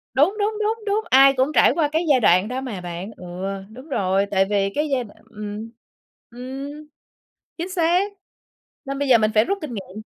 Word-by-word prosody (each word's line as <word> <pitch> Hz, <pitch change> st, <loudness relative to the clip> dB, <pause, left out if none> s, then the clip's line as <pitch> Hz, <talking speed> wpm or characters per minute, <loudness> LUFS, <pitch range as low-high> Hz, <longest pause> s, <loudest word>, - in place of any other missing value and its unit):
Đúng, 310 Hz, +10 st, +3 dB
đúng, 420 Hz, +1 st, 0 dB
đúng, 440 Hz, +2 st, 0 dB
đúng, 420 Hz, +2 st, 0 dB
ai 270 Hz, +1 st, +7 dB
cũng 265 Hz, +3 st, +2 dB
trải -, -, +5 dB
qua 310 Hz, -2 st, +1 dB
cái 320 Hz, +3 st, 0 dB
giai 265 Hz, -3 st, +5 dB
đoạn 185 Hz, -1 st, +4 dB
đó 255 Hz, +2 st, -3 dB
mà 215 Hz, -9 st, -5 dB
bạn. 175 Hz, +4 st, -6 dB
Ừ, -, -, -12 dB, 0.5 s
đúng 255 Hz, +7 st, -12 dB
rồi, 195 Hz, -5 st, +1 dB
tại 190 Hz, -1 st, +3 dB
vì 200 Hz, -1 st, +1 dB
cái 300 Hz, +1 st, 0 dB
giai 260 Hz, -2 st, +1 dB
đoạn 210 Hz, -, -16 dB
ừm, 210 Hz, +1 st, -7 dB, 0.6 s
ừm, 270 Hz, +5 st, -8 dB, 0.7 s
chính 345 Hz, +3 st, -4 dB
xác, 365 Hz, +3 st, +1 dB, 0.7 s
nên 275 Hz, +1 st, -4 dB
bây 285 Hz, -, 0 dB
giờ 240 Hz, -, +8 dB
mình 215 Hz, -1 st, +1 dB
phải 215 Hz, -, +5 dB
rút 395 Hz, -, -1 dB
kinh 285 Hz, -6 st, -6 dB
nghiệm. 200 Hz, 0 st, -7 dB
260 Hz, 200 wpm, -22 LUFS, 210-310 Hz, 0.7 s, giờ